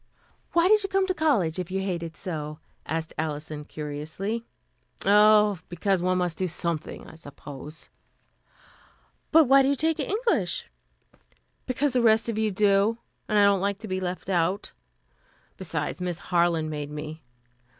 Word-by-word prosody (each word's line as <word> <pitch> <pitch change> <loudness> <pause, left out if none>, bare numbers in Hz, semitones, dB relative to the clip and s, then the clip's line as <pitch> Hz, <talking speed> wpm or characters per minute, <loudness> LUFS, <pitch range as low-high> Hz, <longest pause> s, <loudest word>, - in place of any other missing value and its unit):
"Why 340 +1 +4
did 425 +1 +5
you 390 - -3
come 385 0 +2
to 375 - 0
college, 230 - +1
if 180 -1 -4
you 190 +1 -1
hate 185 -3 -2
it 165 -1 -7
so?" 155 -5 -4 0.3
asked 160 0 -3
Alison 150 -1 -3
curiously. 155 +10 -4 0.6
"Oh, 210 -1 +5
because 185 +1 0
one 185 +1 +1
must 175 -2 -1
do 185 - +1
something, 170 -2 -3
I - - -12
suppose." 145 -1 -10 1.4
"But 320 +1 +7
why 275 0 +6
do 270 - +2
you 280 - +2
take 320 +3 0
English?" 450 +3 0 1.0
"Because 265 +2 +1
the 250 - +3
rest 220 -1 +4
of 220 -1 -2
you 220 -1 +2
do, 205 +2 +3 0.3
and 215 - +1
I 205 - +6
don't 200 -2 +3
like 200 0 0
to 215 +2 -9
be 185 -1 -2
left 180 -1 -4
out. 185 +2 0 0.8
Besides, 165 -3 -4
Miss 180 -2 -2 0.2
Harland 170 -2 +2
made 150 -1 -4
me. 150 +1 -7
185 Hz, 160 wpm, -26 LUFS, 160-220 Hz, 1.4 s, But